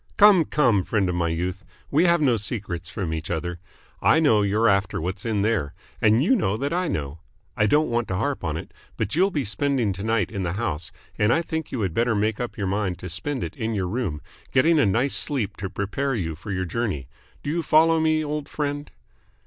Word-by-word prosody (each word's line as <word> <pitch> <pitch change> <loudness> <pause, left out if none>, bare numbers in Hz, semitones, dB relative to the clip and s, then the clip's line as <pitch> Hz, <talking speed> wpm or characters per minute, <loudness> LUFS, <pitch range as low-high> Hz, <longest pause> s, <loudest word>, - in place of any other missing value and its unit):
"Come, 200 -5 +7
come, 120 -12 +2
friend 100 -2 0
of - - -1
my 85 -1 0
youth. 90 +4 -3 0.3
We 155 +5 +4
have 170 -2 +4
no 130 -5 +4
secrets 100 -5 -4
from 90 -6 -3
each 80 0 -4
other. 85 +1 -3 0.4
I 160 - +5
know 115 -10 +4
you're 105 +3 +2
after 100 -2 +2
what's 95 +5 -4
in 105 -3 +1
there, 105 -10 0 0.3
and 110 +4 +4
you 235 - +4
know 105 - 0
that 140 +5 -2
I 180 0 0
know. 75 - -3 0.4
I 105 -3 +2
don't 150 +8 +3
want 120 0 0
to 95 - -2
harp - - -1
on - - -2
it, - - -8 0.2
but 110 +2 -2
you'll 190 +4 +4
be 150 -8 -2
spending 115 +1 0
to 100 +2 -7
night 110 -3 0
in 100 -3 -3
the 85 -2 -2
house, 90 -7 -3 0.3
and 105 +2 +3
I 165 +6 +2
think 160 -1 -4
you 125 - -2
had 95 -5 -1
better 115 +3 +1
make 105 +1 0
up 120 -1 -4
your 100 - -2
mind 95 -2 -1
to 90 - -7
spend 135 - -3
it - - -5
in 115 -4 -2
your 95 -3 -1
room, 90 -8 -2 0.3
getting 155 +5 +4
a 110 - +4
nice 120 +8 +1
sleep 110 -9 +1
to 95 0 -4
prepare 105 +8 -2
you 85 -7 -2
for 95 +6 -8
your 95 -1 -1
journey. 90 - -2 0.4
Do 145 - -2
you 170 +2 0
follow 165 +1 +4
me, 155 -1 +2
old 150 -1 -4
friend?" 145 0 -3
110 Hz, 230 wpm, -24 LUFS, 95-145 Hz, 0.4 s, Come